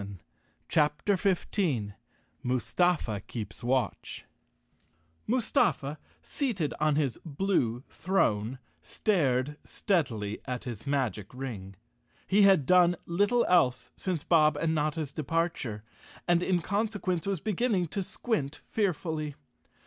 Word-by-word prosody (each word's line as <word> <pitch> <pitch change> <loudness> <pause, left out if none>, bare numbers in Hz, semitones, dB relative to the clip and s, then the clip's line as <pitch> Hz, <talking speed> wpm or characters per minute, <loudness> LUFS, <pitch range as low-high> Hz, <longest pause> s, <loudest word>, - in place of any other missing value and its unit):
201 100 -3 -10 0.4
CHAPTER 150 +5 +2
15 175 - 0 0.5
Mustafa 125 - +1
Keeps 110 -1 -6
Watch 125 -3 -1 1.0
M 240 - +3
USTAEA, 155 - +1 0.3
seated 215 - -1
on 155 -1 +2
his 145 -5 0
blue 140 - 0
throne, 130 - 0 0.2
stared 150 - 0
steadily 115 - -1
at 125 -2 -4
his 120 -1 -7
magic 125 -8 -1
ring. 105 -8 -6 0.5
He 200 +2 +3
had 195 -8 +6
done 175 +1 +5
little 205 +8 +2
else 130 -9 +2
since 180 -6 -3
Bob 155 -3 +4
and 160 +1 0
Notta's 155 -1 -1
departure, 155 -8 -2 0.4
and 175 -1 +4
in 180 -2 +1
conse¬ 210 +3 -1
quence 180 -2 -1
was 195 -3 0
beginning 215 -1 0
to 200 - -2
squint 180 - -2
fearfully. 160 -7 -1
155 Hz, 115 wpm, -29 LUFS, 125-185 Hz, 1.0 s, had